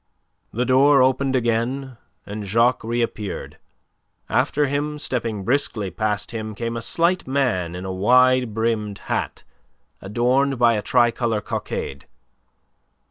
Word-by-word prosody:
The 125 +3 -1
door 135 +1 +5
opened 135 +1 +1
again, 125 +2 -1 0.3
and 105 +1 -6
Jacques 115 +5 +2
reappeared; 115 -3 -3 0.7
after 150 0 +1
him, 145 +2 -2
stepping 115 -7 -2
briskly 120 -5 -1
past 105 -3 -2
him, 110 -2 -5
came 115 +2 -3
a 115 - -3
slight 170 +7 0
man 120 -11 0
in 90 +1 -6
a 95 - -4
wide 125 +4 +4
brimmed 110 -3 -1 0.2
hat, - - -3 0.6
adorned 125 +7 +1
by 120 -1 +4
a 105 - -1
tricolour 120 -1 +1
cockade. 70 -8 -5
120 Hz, 125 wpm, -22 LUFS, 110-130 Hz, 0.7 s, door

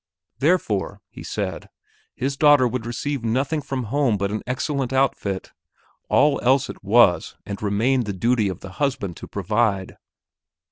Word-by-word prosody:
Therefore, 110 - +1
he - - -10
said, - - -4 0.5
his 135 +2 -2
daughter 145 -3 +5
would 120 -1 -4
receive 135 +2 -3
nothing 135 +7 0
from 135 -2 -3
home 120 -1 +1
but 100 0 -1
an 110 - -2
excellent 130 0 -2
outfit; 130 -8 0 0.6
all 145 -1 +3
else 130 +2 +2
it - - -15
was 100 -5 +4
and 100 -1 -6
remained 115 +5 +1
the - - -1
duty 110 +2 +1
of 95 - -6
the 95 - -9
husband 130 - -1
to - - -9
provide. 105 -3 -1
120 Hz, 150 wpm, -23 LUFS, 100-135 Hz, 0.6 s, daughter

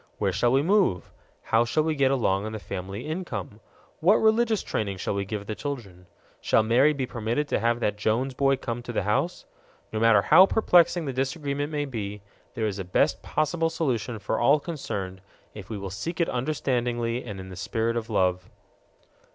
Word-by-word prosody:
Where - - 0
shall 120 - +2
we 135 +2 +3
move? 180 - +2 0.3
How 115 +1 +3
shall 120 +6 +1
we 160 0 0
get 140 -3 +2
along 100 -7 +1
on 110 - -6
the - - -3
family 100 +1 -6
income? 140 - -5 0.4
What 185 +6 +5
religious 220 -1 +2
training 100 -3 -2
shall 95 - -2
we 100 0 -2
give 105 0 -5
the 110 - -4
children? 105 -6 -7 0.3
Shall 110 - +3
Mary 125 +7 +4
be 140 -3 -2
permitted 120 +5 -2
to - - +1
have 120 +1 +1
that 105 -2 0
Jones 115 +6 0
boy 135 +1 +2
come 120 -2 -5
to 120 - -7
the 110 - -1
house? 105 - -1 0.5
No 110 - -1
matter 110 -3 +5
how 185 - +7
perplexing 175 -5 +3
the 135 - -3
disagreement 140 +2 -2
may 145 -1 -1
be, 105 -6 -5 0.3
there 110 - -1
is 100 -2 -2
a - - -2
best 90 - +1
possible 165 +2 0
solution 125 -8 -2
for 105 +2 -2
all 140 +5 +4
concerned 120 - -5 0.3
if 100 -3 -10
we 110 - -4
will 100 -1 -6
seek 165 - -5
it 170 - +2
understandingly 125 -3 -1
and 100 -4 -7
in 95 0 -8
the 95 - -9
spirit 115 +5 -1
of 115 -1 -3
love. 90 -3 0
120 Hz, 195 wpm, -26 LUFS, 105-145 Hz, 0.5 s, how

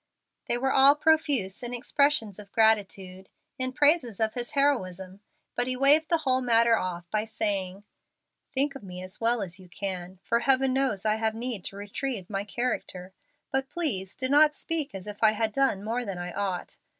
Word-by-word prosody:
They 240 - 0
were 265 +2 0
all 270 +2 +6
profuse 295 -11 +1
in 245 0 -3
expressions 245 -5 +1
of 200 -1 -11
gratitude, 195 -4 +1 0.3
in 255 0 -1
praises 285 - +2
of 220 -1 +1
his 245 +4 -4
heroism, 190 -10 0 0.4
but 245 0 0
he 255 0 -2
waived 290 +4 +5
the 335 - +3
whole 260 0 +2
matter 235 -1 +4
off 175 -3 -4
by 215 0 0
saying, 200 -3 -2 0.7
"Think 280 +1 0
of 275 - -9
me 180 -2 -8
as 185 +4 -7
well 230 -1 +2
as 185 0 -2
you 185 -1 -15
can, 185 -1 -5
for 235 - +1
Heaven 265 +1 +2
knows 260 -7 0
I 215 0 +2
have 220 0 -1
need 230 -4 -4
to - - -5
retrieve 205 0 -5
my 195 0 -2
character. 200 -5 -4 0.4
But 270 0 -1
please 205 - -2
do 260 - -2
not 295 +2 +5
speak 315 - -3
as 190 - -7
if 210 -1 -8
I 215 -1 +5
had 220 0 -1
done 265 -7 +1
more 235 +3 -2
than 195 -5 -5
I 175 0 -5
ought. 195 -3 -3
225 Hz, 190 wpm, -27 LUFS, 195-265 Hz, 0.7 s, all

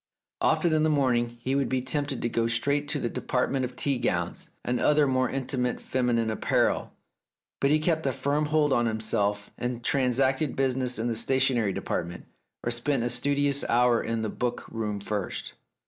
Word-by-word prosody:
Often 170 -3 +3
in 155 - +3
the 155 - +3
morning 125 -5 +2
he 130 +2 -1
would 140 0 +1
be 130 - +1
tempted 140 0 -2
to - - +2
go 115 0 0
straight 140 +5 +1
to 145 0 -1
the 120 - -1
department 125 +2 -1
of 125 0 -8
tea 135 0 0
gowns - - -2 0.2
and 125 0 0
other 150 0 +4
more 130 -1 +1
intimate 125 -2 -2
feminine 120 -3 0
apparel, 110 - 0 0.7
but 140 - +2
he 150 - +5
kept 160 -1 0
a - - +2
firm 145 +4 0
hold 150 -2 +2
on 120 -1 +2
himself 105 -2 -1
and 120 -1 -3
transacted 130 +2 +1
business 130 -2 0
in 115 +2 -1
the 120 - 0
stationery 125 -2 +2
department, 85 -2 -4 0.4
or 120 - -1
spent 120 +2 0
a 120 - 0
studious 140 +3 +1
hour 120 0 +4
in 115 -1 -2
the 110 - -1
book 120 +2 -3
room 105 -3 -3
first. 100 -1 -4
125 Hz, 180 wpm, -27 LUFS, 115-140 Hz, 0.7 s, he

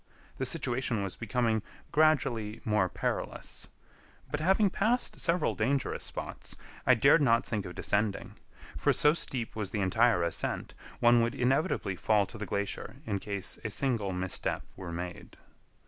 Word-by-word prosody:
The - - 0
situation 120 -4 -1
was 95 - -4
becoming 115 -1 0 0.3
gradually 130 -8 +2
more 105 -4 +2
perilous; - - -4 0.6
but, 150 - -1
having 190 +4 +3
passed 235 +7 +1
several 170 +2 +2
dangerous 135 +5 0
spots, - - -6 0.3
I 130 - +7
dared 140 +6 +5
not 115 -4 +4
think 105 -5 -3
of 90 - -9
descending; 100 0 -1 0.4
for, - - +2
so 150 - +4
steep 125 -8 -3
was 105 -3 -3
the 100 +1 -2
entire 110 0 +3
ascent, 85 - -2 0.3
one 120 0 +6
would 115 +3 0
inevitably 130 - +1
fall 105 +2 +2
to 110 - -11
the 105 - -4
glacier 100 +3 -3
in 100 -5 -1
case 100 -1 -4
a 110 - -2
single 110 -3 0
misstep 90 0 -2
were 90 -3 -7
made. 90 +1 -6
115 Hz, 150 wpm, -30 LUFS, 100-130 Hz, 0.6 s, I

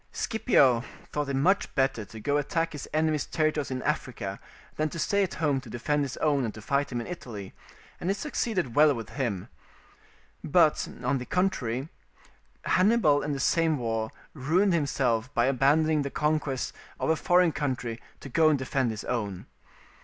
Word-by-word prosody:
Scipio 130 - +3 0.3
thought 150 -1 -2
it 135 - -1
much 185 +9 +2
better 135 -5 +1
to 110 +3 -11
go 145 +6 0
and 145 - +1
attack 165 +3 -1
his 145 - -7
enemy's 155 -1 +1
territories 155 -4 0
in 130 -1 -3
Africa - - -3 0.4
than 155 0 0
to 170 - -7
stay 200 +5 +1
at 190 - -1
home 145 -4 +1
to 125 - -12
defend 145 +6 -1
his 135 -2 -5
own 145 -3 +2
and 115 - -2
to - - -8
fight 140 +3 0
him 120 - -2
in 120 - -5
Italy, 115 - -7 0.5
and 175 - -2
it 200 - +1
succeeded 200 - -2
well 150 0 +5
with 115 -2 -6
him. 115 -10 -2 1.0
But, - - +3 0.2
on 130 +2 +1
the 125 - -6
contrary, 135 -9 0 0.8
Hannibal 185 -7 +4
in 145 - -2
the 140 - -3
same 160 +3 +2
war 115 -3 -2 0.2
ruined 170 +8 +2
himself 130 -6 0
by 120 - +3
abandoning 145 +4 +3
the 140 - -2
conquest 150 -3 -1 0.3
of - - +1
a - - +3
foreign 175 +1 +3
country 125 -6 -3 0.2
to - - -8
go 155 +4 +4
and 150 - +3
defend 130 -1 0
his 110 -1 -5
own. 105 -7 -3
140 Hz, 180 wpm, -28 LUFS, 125-160 Hz, 1.0 s, well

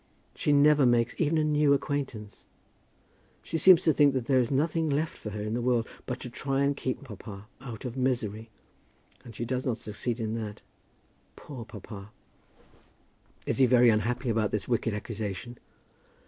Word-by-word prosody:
She 150 - 0
never 145 -1 +5
makes 120 -1 +2
even 160 0 +2
a 155 - +2
new 150 -1 +3
acquaintance. 135 -8 -4 1.0
She 165 - -3
seems 185 +1 +7
to 160 - +4
think 145 -2 +4
that 125 -3 -1
there 130 0 +3
is 120 - +1
nothing 155 +3 +1
left 150 +3 -1
for 105 - -7
her 105 0 -5
in 105 +1 -3
the 120 - -1
world 120 -1 +1 0.2
but 125 -1 -3
to 125 - -6
try 135 +2 -1
and 140 0 +1
keep 130 0 -3
papa 105 -4 -9
out 125 -3 -8
of 125 -1 -4
misery. 115 -4 -1 0.7
And 115 -3 -12
she 120 - -3
does 130 +2 -2
not 120 -3 0
succeed 110 +3 -4
in 110 -1 -2
that. 105 -1 -8 0.7
Poor 130 -6 -9
papa!" 105 -2 -10 1.4
"Is - - -1
he 130 - +6
very 120 -1 +6
unhappy 120 +4 0
about 110 -2 +1
this 105 -2 -2
wicked 115 -3 0
accusation?" 110 +2 -5
125 Hz, 175 wpm, -28 LUFS, 110-140 Hz, 1.4 s, seems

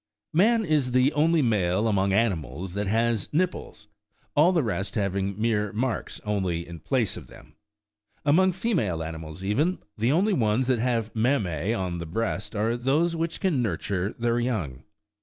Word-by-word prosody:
Man 220 +6 +4
is 145 -6 +1
the 130 +3 +4
only 160 +1 +3
male 105 -2 +1
among 100 -2 +2
animals 90 - -1
that 100 0 -2
has 115 +1 +1
nipples, 180 +4 -2 0.5
all 155 +5 +5
the 170 -5 +2
rest 100 -3 -3
having 100 -1 -1
mere 105 -2 +1
marks 115 +2 -2
only 95 -5 -1
in 85 -1 -9
place 120 - 0
of - - -10
them. - - -16 0.7
Among 185 +6 +4
female 165 - -1
animals 80 +2 -7
even, 145 - +1 0.2
the 115 +4 +2
only 195 +7 +3
ones 115 - +2
that 125 -2 +1
have 115 -2 -1
mammseon 95 - 0
the 85 - -5
breast 100 +2 -3
are 110 +3 +1
those 145 +8 +1
which 165 0 -2
can 175 -10 +1
nurture 95 -1 -1
their 120 0 +1
young. 90 - -2
115 Hz, 160 wpm, -26 LUFS, 95-140 Hz, 0.7 s, all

